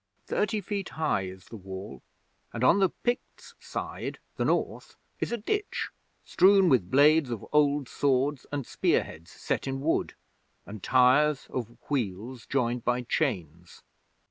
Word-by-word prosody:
Thirty 210 Hz, 0 st, 0 dB
feet 200 Hz, 0 st, -4 dB
high 100 Hz, -11 st, 0 dB
is 95 Hz, 0 st, -10 dB
the -, -, -11 dB
Wall, 95 Hz, -8 st, -8 dB, 0.5 s
and 120 Hz, -, -3 dB
on 170 Hz, +10 st, +5 dB
the 190 Hz, -2 st, +4 dB
Picts' 245 Hz, +1 st, -4 dB
side, -, -, -5 dB, 0.2 s
the -, -, -1 dB
North, -, -, -1 dB, 0.2 s
is -, -, -2 dB
a 235 Hz, -, 0 dB
ditch, 410 Hz, -, -2 dB, 0.4 s
strewn 190 Hz, 0 st, +5 dB
with 110 Hz, -10 st, +3 dB
blades 145 Hz, +2 st, +5 dB
of 115 Hz, -4 st, -5 dB
old 145 Hz, -2 st, +3 dB
swords 135 Hz, +2 st, 0 dB
and 145 Hz, -3 st, -3 dB
spear -, -, +1 dB
heads 80 Hz, +3 st, -12 dB
set -, -, -3 dB
in 135 Hz, 0 st, -2 dB
wood, 155 Hz, +4 st, 0 dB, 0.5 s
and 105 Hz, -1 st, -9 dB
tyres 130 Hz, +5 st, +4 dB
of 120 Hz, -2 st, -5 dB
wheels 120 Hz, -2 st, -3 dB
joined 125 Hz, -3 st, 0 dB
by 125 Hz, +1 st, 0 dB
chains. 90 Hz, -, -3 dB
130 Hz, 145 wpm, -28 LUFS, 110-150 Hz, 0.5 s, on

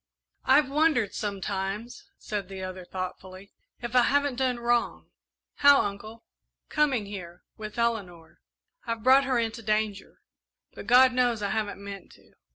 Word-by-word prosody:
"I've 270 Hz, +1 st, +5 dB
wondered 280 Hz, -7 st, +1 dB
sometimes," 200 Hz, +2 st, -4 dB
said 205 Hz, -3 st, -5 dB
the 190 Hz, -1 st, -7 dB
other, 185 Hz, 0 st, -6 dB
thoughtfully, 185 Hz, +1 st, -7 dB, 0.3 s
"if 240 Hz, +1 st, -5 dB
I 250 Hz, -, +7 dB
haven't 285 Hz, 0 st, +1 dB
done 255 Hz, -2 st, 0 dB
wrong." 235 Hz, 0 st, -1 dB, 0.5 s
"How, 285 Hz, -1 st, +6 dB
Uncle?" 215 Hz, +3 st, -6 dB, 0.5 s
"Coming 280 Hz, -8 st, +1 dB
here 180 Hz, -3 st, -9 dB
with 215 Hz, 0 st, -8 dB
Eleanor. 200 Hz, -8 st, -3 dB, 0.5 s
I've 230 Hz, -1 st, -3 dB
brought 265 Hz, +2 st, +6 dB
her 260 Hz, -2 st, +1 dB
into 230 Hz, 0 st, -2 dB
danger, 215 Hz, -2 st, -2 dB, 0.5 s
but -, -, -10 dB
God 255 Hz, +1 st, +6 dB
knows 245 Hz, -4 st, +1 dB
I 200 Hz, -, -1 dB
haven't 205 Hz, -2 st, -3 dB
meant 200 Hz, -1 st, -9 dB
to. -, -, -22 dB
220 Hz, 145 wpm, -27 LUFS, 200-250 Hz, 0.5 s, I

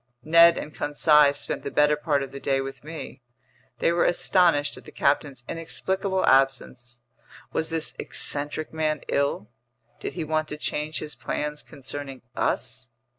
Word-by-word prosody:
Ned 170 Hz, +2 st, +7 dB
and 150 Hz, -, -6 dB
Conseil 150 Hz, 0 st, +4 dB
spent 145 Hz, -, -3 dB
the -, -, -4 dB
better 150 Hz, +1 st, +3 dB
part 145 Hz, -2 st, 0 dB
of 135 Hz, -, -8 dB
the 140 Hz, -, -7 dB
day 135 Hz, 0 st, 0 dB
with 135 Hz, 0 st, -6 dB
me. 155 Hz, -3 st, -8 dB, 0.6 s
They -, -, +2 dB
were 170 Hz, 0 st, +2 dB
astonished 170 Hz, -5 st, +3 dB
at -, -, -13 dB
the -, -, -11 dB
captain's 140 Hz, -3 st, 0 dB
inexplicable 190 Hz, +3 st, -2 dB
absence. 125 Hz, -2 st, +1 dB, 0.5 s
Was 160 Hz, -, -1 dB
this 165 Hz, -1 st, -1 dB
eccentric 145 Hz, +2 st, -2 dB
man 155 Hz, -2 st, -1 dB
ill? 140 Hz, -6 st, 0 dB, 0.5 s
Did -, -, -5 dB
he 170 Hz, -, -3 dB
want 155 Hz, 0 st, -1 dB
to 150 Hz, -, -5 dB
change 150 Hz, +1 st, -2 dB
his 150 Hz, -1 st, -3 dB
plans 150 Hz, +5 st, -3 dB
concerning 135 Hz, -2 st, -8 dB
us? -, -, -2 dB
150 Hz, 155 wpm, -25 LUFS, 140-160 Hz, 0.6 s, Ned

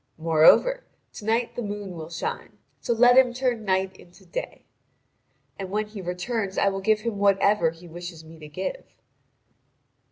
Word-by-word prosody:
Moreover, 165 Hz, -, +4 dB, 0.3 s
to 210 Hz, -, -9 dB
night 230 Hz, +2 st, 0 dB
the -, -, -3 dB
moon 205 Hz, -2 st, -5 dB
will 160 Hz, -2 st, -8 dB
shine; 170 Hz, 0 st, -5 dB, 0.2 s
so -, -, -3 dB
let 245 Hz, +2 st, +6 dB
him 250 Hz, -2 st, +3 dB
turn 250 Hz, -3 st, -1 dB
night 190 Hz, 0 st, 0 dB
into 175 Hz, 0 st, -18 dB
day. -, -, -6 dB, 0.9 s
And 190 Hz, -1 st, -5 dB
when 210 Hz, +2 st, -1 dB
he 210 Hz, -1 st, -9 dB
returns 190 Hz, +3 st, -3 dB
I 200 Hz, -, +3 dB
will 195 Hz, 0 st, -4 dB
give 215 Hz, +2 st, +2 dB
him 220 Hz, -3 st, -3 dB
whatever 200 Hz, -3 st, +3 dB
he 165 Hz, +2 st, -13 dB
wishes 170 Hz, -1 st, -9 dB
me 160 Hz, 0 st, -14 dB
to 150 Hz, -, -10 dB
give." 185 Hz, -, -6 dB
200 Hz, 165 wpm, -25 LUFS, 175-230 Hz, 0.9 s, let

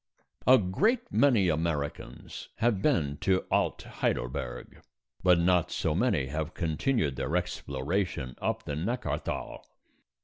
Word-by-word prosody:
A 130 Hz, +1 st, +9 dB
great 215 Hz, -, +1 dB
many 120 Hz, -9 st, +4 dB
Americans 80 Hz, -3 st, -3 dB
have 115 Hz, -4 st, +1 dB
been 75 Hz, -7 st, +1 dB
to 95 Hz, +3 st, +1 dB
Alt -, -, +1 dB
Heidelberg, -, -, -3 dB, 0.4 s
but 90 Hz, -1 st, +5 dB
not 90 Hz, -1 st, +3 dB
so 80 Hz, -, -1 dB
many 95 Hz, -, +1 dB
have 75 Hz, +3 st, -4 dB
continued 80 Hz, -, 0 dB
their 75 Hz, +6 st, -2 dB
exploration 75 Hz, -3 st, -2 dB
up -, -, -1 dB
the 75 Hz, -, -4 dB
Neckarthal. 115 Hz, -, -3 dB
85 Hz, 115 wpm, -29 LUFS, 75-100 Hz, 0.4 s, A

